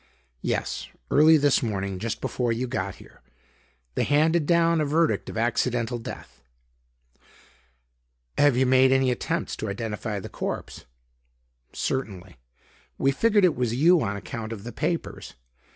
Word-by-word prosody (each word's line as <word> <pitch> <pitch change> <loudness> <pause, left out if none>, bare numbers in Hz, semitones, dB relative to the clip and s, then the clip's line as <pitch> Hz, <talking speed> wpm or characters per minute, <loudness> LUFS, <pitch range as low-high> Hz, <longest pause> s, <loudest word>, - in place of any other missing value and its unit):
"Yes; - - -2 0.2
early 155 +2 +6
this 145 -2 +3
morning; 100 -5 -3
just 115 +2 -4
before 120 -2 -1
you 115 +3 -1
got 100 -7 -3
here. - - -17 0.7
They - - 0
handed 155 +2 +2
down 170 -1 +3
a - - +2
verdict 160 +3 +1
of - - -7
accidental 120 +1 0
death." 115 - -9 1.9
"Have 145 -4 +4
you 130 - +3
made 130 +1 +5
any 135 -1 +3
attempts 125 - -2
to 110 - -4
identity 105 0 -4
the - - -7
corpse?" - - -5 0.9
"Certainly. 95 - -4 0.6
We 135 - +2
figured 205 +6 +3
it 170 - +2
was 120 -2 -1
you 165 +5 +5
on 100 0 -2
account 110 +2 -6
of 105 -3 -7
the 120 - -6
papers. 170 +7 -3
125 Hz, 140 wpm, -25 LUFS, 110-150 Hz, 1.9 s, early